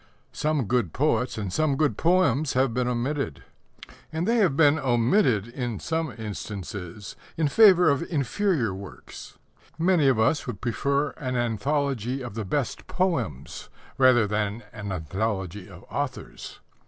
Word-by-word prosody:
Some 150 -4 0
good 115 -6 0
poets 130 -4 0
and 100 -4 -4
some 155 +1 +1
good 150 -1 +1
poems 155 -5 +2
have 130 -2 +2
been 125 +1 0
omitted. 125 - -2 0.7
And 160 +2 -2
they 235 +1 +3
have 180 -11 +2
been 150 -1 +5
omitted, 120 - +2
in 120 -4 -4
some 160 -3 -2
instances, 100 -3 -7 0.2
in 160 -2 +2
favour 185 +1 +6
of 140 -2 +3
inferior 150 - 0
work. 95 0 -10 0.6
Many 165 -3 +3
of 130 -4 +4
us 110 +8 +1
would 115 -6 -5
prefer 140 +5 0
an 125 -3 -3
anthology 130 +2 -1
of 120 -4 -7
the 110 -1 -4
best 140 +6 -2
poems 165 - -2 0.3
rather 130 -4 +5
than 105 +2 -2
an 105 -3 -6
anthology 95 +2 -3
of 90 0 -13
authors. 140 -3 -5
125 Hz, 140 wpm, -26 LUFS, 105-150 Hz, 0.7 s, favour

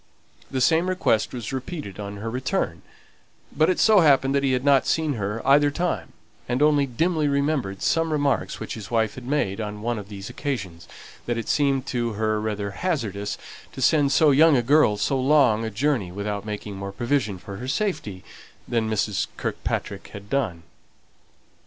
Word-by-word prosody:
The 130 -1 -2
same 165 +8 +3
request 180 -12 +1
was 120 -1 -6
repeated 130 - -6
on 100 0 -6
her 110 +3 -4
return; 125 +2 -2 0.7
but 155 +2 +3
it 185 - +1
so 215 -2 +6
happened 140 -4 +4
that 140 - +2
he 135 -1 +1
had 125 +2 -1
not 140 -2 +4
seen 160 -2 +1
her 105 -1 -4
either 145 +1 +5
time; 145 - -2 0.4
and 125 +1 0
only 145 -2 +4
dimly 155 +5 0
remembered 140 -8 -1
some 165 0 +1
remarks 145 -2 0
which - - -5
his 105 -4 -8
wife 110 -3 +1
had 125 -1 -10
made 115 -8 0
on 105 0 -6
one 120 -1 -1
of 100 0 -10
these 100 -1 -7
occasions, 100 - -5 0.4
that 120 -1 -1
it 115 - -4
seemed 140 -2 +1
to 120 -4 -2
her 110 0 0
rather 105 -2 -3
hazardous 105 - -2 0.4
to - - -9
send 145 0 +4
so 150 +1 +5
young 150 +1 +6
a 120 - +1
girl 135 -5 +4
so 135 +6 0
long 130 -5 +4
a 110 - -2
journey 115 -4 0
without 100 +1 -4
making 105 -1 -5
more 100 0 -5
provision 120 -1 -1
for 100 +2 -9
her 125 +4 -6
safety 130 - -2 0.4
than 115 -2 0
Mrs. 105 -2 0
Kirkpatrick - - -3
had 100 0 -10
done. 105 -12 -1
125 Hz, 180 wpm, -24 LUFS, 105-145 Hz, 0.7 s, so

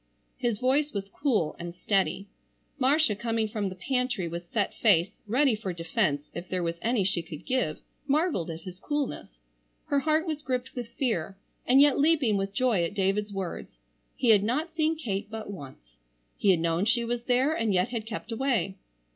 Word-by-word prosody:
His 240 -4 0
voice 280 +5 +1
was 200 -1 -4
cool 220 - 0
and 170 0 -6
steady. 195 +1 0 0.5
Marcia 275 -3 +3
coming 225 0 -1
from 210 -2 -2
the 185 - -8
pantry 250 -2 -1
with 170 +1 -6
set 205 -4 0
face, 190 -5 +2
ready 260 +4 +3
for 200 -4 -4
defence 155 -4 -1
if 175 +1 -7
there 185 -1 -1
was 170 0 -2
any 230 -3 +1
she 185 -2 0
could 160 -2 -10
give, 255 -12 0 0.3
marvelled 290 - +1
at 165 0 -6
his 185 -1 -9
coolness. 285 - -3 0.5
Her 285 - +2
heart 310 +3 +2
was 310 -3 -3
gripped 255 -1 -3
with 245 -2 -5
fear, 220 - -2 0.3
and 265 +3 +7
yet 290 -1 +5
leaping 290 -7 +3
with 195 0 -1
joy 225 -4 +2
at 170 +4 -3
David's 205 +1 +1
words. 190 - -5 0.4
He 250 - +1
had 210 -3 +7
not 300 +10 -1
seen 320 0 +1
Kate 205 -8 -3
but 220 -2 -6
once. 130 - -11 0.4
He 200 - +1
had 175 -4 +4
known 170 +3 +1
she 235 +1 +2
was 240 0 -3
there 260 +4 +3
and 225 -8 0
yet 185 +3 +2
had 225 -3 -4
kept 225 +1 -6
away. 225 -6 0
215 Hz, 190 wpm, -28 LUFS, 185-260 Hz, 0.5 s, and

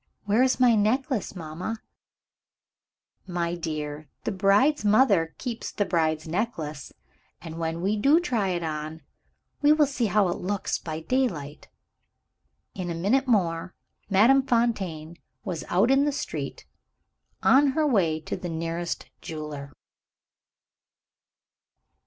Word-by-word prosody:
"Where 210 +4 +3
is 260 0 +2
my 250 -2 +6
necklace, 225 +1 0
mamma?" 180 +6 -5 1.5
"My 175 -2 -2
dear, 155 -3 -4 0.2
the - - -1
bride's 205 +9 +3
mother 205 -7 +3
keeps 240 -3 -5
the 205 - -1
bride's 160 -3 0
necklace 160 - -3 0.5
and, 165 0 -8
when 165 0 -2
we 200 +4 0
do 280 +10 +5
try 240 - 0
it 175 -2 -1
on, 155 0 -5 0.6
we 295 0 +5
will 305 -1 +5
see 265 -4 -1
how 205 0 +3
it 175 - -3
looks 200 +2 -2
by 160 -1 -5
daylight." 160 - -2 1.0
In 185 -2 -5
a 170 - -3
minute 230 +11 +1
more, 180 -6 0 0.3
Madame 230 +8 +5
Fontaine 195 - -1 0.3
was 175 -4 -4
out 200 +8 +3
in 275 +1 +4
the 295 - +1
street, 280 - -5 0.8
on 275 0 +5
her 310 - +3
way 180 - +2
to - - -4
the 175 - -6
nearest 165 +1 -3
jeweler. 150 -3 -7
190 Hz, 130 wpm, -26 LUFS, 165-240 Hz, 1.5 s, my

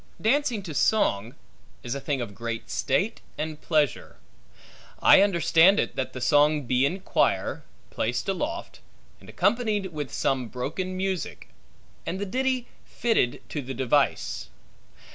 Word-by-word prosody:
Dancing 240 -2 +1
to 165 -4 -6
song, 120 - +1 0.5
is 120 - -3
a 140 - -3
thing 140 -2 -2
of 115 -4 -5
great 115 +1 -5
state 195 - 0 0.2
and 155 0 -4
pleasure. 150 -5 0 0.8
I - - +7
understand 185 0 +5
it, - - -1
that 130 - -3
the 130 - -6
song 145 +4 +3
be 130 +2 +2
in 185 +6 -4
quire, - - 0 0.3
placed 120 - -2
aloft, 300 - -3 0.4
and - - -15
accompanied 210 -6 0
with 145 -3 -4
some 130 -3 0
broken 170 - -4
music; 190 -1 -3 0.5
and 185 - -3
the 205 - -2
ditty 255 +3 0 0.2
fitted 225 - 0
to 150 - -3
the 135 0 -6
device. 130 - 0
155 Hz, 140 wpm, -26 LUFS, 130-200 Hz, 0.8 s, I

